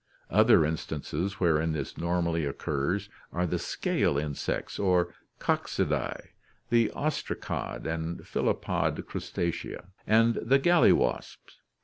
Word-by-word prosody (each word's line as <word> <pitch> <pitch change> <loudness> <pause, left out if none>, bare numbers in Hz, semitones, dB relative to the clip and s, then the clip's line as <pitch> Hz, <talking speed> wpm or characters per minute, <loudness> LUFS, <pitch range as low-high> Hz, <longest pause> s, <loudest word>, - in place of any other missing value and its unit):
Other 110 -4 +6
instances 80 +4 -3
wherein 80 -2 +2
this 70 -4 -4
normally 85 -1 0
occurs 75 +7 -1 0.2
are 90 +1 0
the 85 - -1
scale 70 - 0
insects 75 -1 -3
or 90 -3 +2 0.2
Coccidae, - - -1 0.4
the 115 -2 +4
ostracod 145 - -3
and 80 +1 -2
phyllopod - - -1
Crustacea, 85 +1 -4 0.2
and 115 +1 +4
the 130 +4 +4
gall 175 +5 +5
wasps. - - -3
85 Hz, 105 wpm, -28 LUFS, 80-105 Hz, 0.4 s, Other